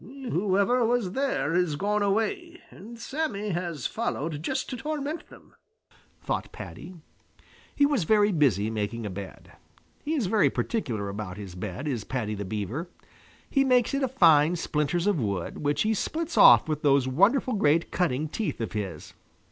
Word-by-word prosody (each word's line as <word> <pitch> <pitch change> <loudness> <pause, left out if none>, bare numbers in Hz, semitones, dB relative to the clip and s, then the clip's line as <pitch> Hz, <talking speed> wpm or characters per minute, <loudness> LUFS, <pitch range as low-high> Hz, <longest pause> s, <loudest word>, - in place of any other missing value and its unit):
"Whoever 235 - 0
was 230 -5 +1
there 185 - -1
has 175 -4 +1
gone 205 +6 0
away, 335 - -1
and 230 +5 -11
Sammy 230 -5 -3
has 170 -6 -3
followed 160 - -2
just 265 +10 -2
to - - -3
torment 305 +3 -4
them," - - -17 0.7
thought - - -3
Paddy. 185 - -9 0.8
He 285 - +4
was 280 - +1
very 210 +2 +4
busy 115 - +2
making 110 +1 -3
a 105 - -4
bed. 95 -1 -9 0.5
He 310 +2 -1
is 265 -8 0
very 210 +3 +3
particular 115 - -2
about 100 -2 -6
his 100 -4 -8
bed, 95 - -5
is 120 -7 -2
Paddy 115 -4 -3
the 100 -1 -4
Beaver. 110 - -4 0.6
He 275 - +2
makes 250 -2 +3
it 275 - 0
of 260 -2 0
fine 165 - +5
splinters 160 +1 -1
of 205 -6 +2
wood 100 -5 -3
which 145 0 0
he 220 +1 +1
splits 320 - -3
off - - +8
with 155 -1 -2
those 140 -2 +3
wonderful 205 - +3
great 165 -5 +2
cutting 155 -4 0
teeth 205 - -3
of 115 - -3
his. 95 -7 -5
175 Hz, 165 wpm, -27 LUFS, -, 0.8 s, off